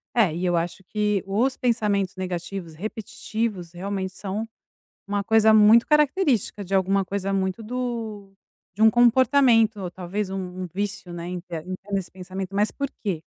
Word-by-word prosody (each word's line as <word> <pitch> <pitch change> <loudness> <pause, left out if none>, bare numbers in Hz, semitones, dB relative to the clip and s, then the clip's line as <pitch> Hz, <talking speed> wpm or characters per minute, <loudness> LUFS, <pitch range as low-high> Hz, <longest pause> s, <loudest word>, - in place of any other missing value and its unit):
É, 215 -9 +4
e 175 +3 -2
eu 175 -1 +2
acho 170 +3 -3
que 210 0 0
os 235 +7 +1
pensamentos 210 -6 0
negativos 180 -1 -5
repetitivos, 215 -1 -4
realmente, 190 +1 -4
são 205 +3 -4 0.6
uma 205 0 0
coisa 220 +1 +5
muito 215 +2 +7
característica 295 - +2
de 195 +1 -3
alguma 195 +1 +2
coisa 195 +1 -3
muito 190 +2 -1
do 225 -4 -4 0.4
de 210 - -2
um 220 - +8
comportamento 240 -2 +4
ou, 180 -2 -4
talvez, 185 +3 -4
um 190 - -4 0.3
um - - -4
vício, 195 -2 -3
né, 170 0 -6
em 180 0 -4
ter 170 -2 -7
em 185 - -4
ter 200 +1 -4
esse 185 - -6
pensamento, 190 +1 -7
mas 210 +1 +2
por 280 -1 -4
quê? 185 -7 -2
200 Hz, 170 wpm, -24 LUFS, 185-220 Hz, 0.6 s, um